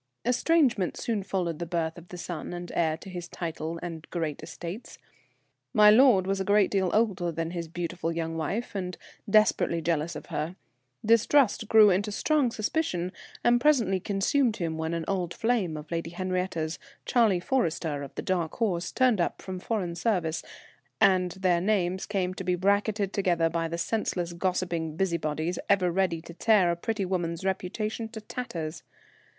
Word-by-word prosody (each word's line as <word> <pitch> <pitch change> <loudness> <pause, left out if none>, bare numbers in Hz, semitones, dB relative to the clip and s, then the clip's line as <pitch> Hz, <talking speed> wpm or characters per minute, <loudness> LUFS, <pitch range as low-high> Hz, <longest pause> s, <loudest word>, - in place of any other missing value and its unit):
Estrangement 250 - +2
soon 225 -4 -1
followed 180 -4 -2
the 170 - -2
birth 165 -1 -1
of 170 0 -12
the 180 - -9
son 175 -1 -5
and 175 0 -6
heir 160 -2 +1
to 170 - -13
his 175 -2 -6
title 165 -1 -4
and 165 -2 -7
great 160 -4 -3
estates. 170 +6 -8 0.8
My 210 -1 +8
lord 225 -5 +6
was 195 0 0
a - - 0
great 205 0 +3
deal 190 -2 +2
older 200 -6 +1
than 165 +1 -3
his 170 -2 -4
beautiful 170 0 -3
young 165 -1 -3
wife, 190 +11 -3
and 180 -2 -4 0.3
desperately 210 -5 +3
jealous 165 0 -1
of 150 - -7
her. 155 +4 -2 0.5
Distrust 230 +1 +4
grew 215 -2 +7
into 200 +3 0
strong 290 +4 +2
suspicion, 215 - -1 0.3
and 240 0 +4
presently 235 -10 +3
consumed 215 +6 +1
him 165 -5 -2
when 160 +1 -2
an 165 -1 -3
old 180 -3 -1
flame 220 -9 0
of 150 +1 -10
Lady 165 0 -2
Henriette's, 180 -2 -2 0.3
Charlie 225 -8 +3
Forrester, 170 - -1
of 140 - -8
the - - -4
Dark 175 -4 -1
Horse, 180 -7 -1
turned 250 -7 +3
up - - -1
from 185 -1 -6
foreign 185 -4 -2
service, 170 -4 0 0.6
and 185 -4 +4
their 185 -3 +1
names 190 -2 0
came 185 -3 -1
to 190 - -6
be 180 0 +1
bracketed 200 +2 +1
together 175 -4 +2
by 165 0 -1
the 165 +1 -4
senseless 175 -3 -1
gossiping 170 -3 -1
busybodies 170 -2 -1
ever 190 -3 +3
ready 170 -3 0
to 170 - -10
tear 195 -2 +4
a - - 0
pretty 210 +3 -2
woman's 175 -1 -2
reputation 215 +4 -2
to 225 -1 -7
tatters. 180 -8 -5
180 Hz, 170 wpm, -28 LUFS, 170-210 Hz, 0.8 s, My